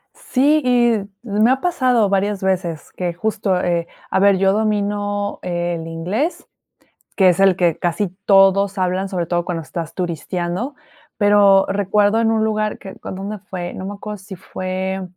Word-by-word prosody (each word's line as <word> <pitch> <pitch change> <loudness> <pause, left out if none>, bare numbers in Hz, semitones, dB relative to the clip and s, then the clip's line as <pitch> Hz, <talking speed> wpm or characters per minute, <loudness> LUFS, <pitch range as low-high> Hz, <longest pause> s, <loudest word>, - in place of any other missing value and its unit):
Sí 290 +4 +2
y 240 -2 +3 0.3
me 215 +1 +2
ha 265 - +2
pasado 255 - +2
varias 200 0 0
veces 180 -4 -2
que 175 -2 -3
justo, 195 0 -1
eh, 170 -1 0 0.2
a - - +2
ver 200 -1 +5
yo 195 0 +3
domino 205 -1 -1
el 175 -2 -3
inglés, 185 - -3 0.7
que 190 -3 +5
es 180 +1 +2
el 195 -2 +5
que 175 -4 +1
casi 175 +3 -1 0.2
todos 195 0 +4
hablan, 185 +1 0
sobre 175 -3 -2
todo, 175 0 -1
cuando 165 -2 -3
estás 160 +3 -6
turisteando, 180 - -3 0.4
pero 205 -2 +5
recuerdo 205 +2 +2
en 225 - +2
un 220 -1 +1
lugar 215 -1 -1
que 195 - -10
con - - -7
¿dónde 200 +2 -5
fue? 175 -2 -5
No 190 - -6
me 200 - -4
acuerdo 210 +1 -7
si 195 0 -10
fue 185 +1 -4
195 Hz, 165 wpm, -19 LUFS, 180-210 Hz, 0.7 s, ver